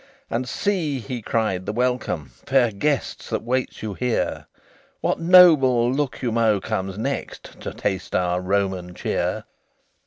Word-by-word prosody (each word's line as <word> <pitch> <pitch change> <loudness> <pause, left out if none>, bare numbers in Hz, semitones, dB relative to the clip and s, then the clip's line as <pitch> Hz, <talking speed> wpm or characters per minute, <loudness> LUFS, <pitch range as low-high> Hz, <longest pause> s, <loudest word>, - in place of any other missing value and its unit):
"And 125 +2 -2
see," 175 -9 -1
he 120 +1 -5
cried, 105 -5 -1
"the - - 0
welcome, 125 - -1 0.2
Fair 130 -3 +3
guests, 140 +7 -2
that - - -2
waits 125 0 -2
you 105 -2 -3
here! 125 +3 -2 0.5
What - - 0
noble 150 -9 +6
Lucomo 115 -6 +1
comes 95 0 -3
next 135 +5 -5
To - - -5
taste 95 -2 -3
our 90 0 +1
Roman 95 -2 -1
cheer?" - - -2
120 Hz, 130 wpm, -23 LUFS, 100-130 Hz, 0.5 s, noble